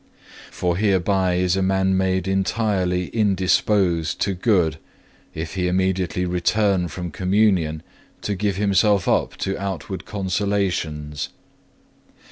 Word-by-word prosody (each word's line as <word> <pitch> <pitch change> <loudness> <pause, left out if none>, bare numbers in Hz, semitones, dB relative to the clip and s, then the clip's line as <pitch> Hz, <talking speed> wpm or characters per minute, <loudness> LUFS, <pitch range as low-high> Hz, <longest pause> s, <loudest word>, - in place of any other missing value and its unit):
For 90 -1 -1
hereby 95 -2 +2
is 90 0 +1
a 95 - 0
man 95 0 +2
made 95 0 0
entirely 95 -2 0
indisposed 95 -4 +1
to 100 - +1
good, 90 - +1 0.6
if 80 +1 -5
he 90 -2 -1
immediately 90 -1 0
return 90 +1 +1
from 85 +1 -6
Communion 90 -4 +1 0.4
to 105 - -1
give 100 0 -1
himself 100 0 +2
up - - +1
to 95 - -2
outward 95 -1 -5
consolations. 95 -7 -2
95 Hz, 110 wpm, -22 LUFS, 90-100 Hz, 0.6 s, hereby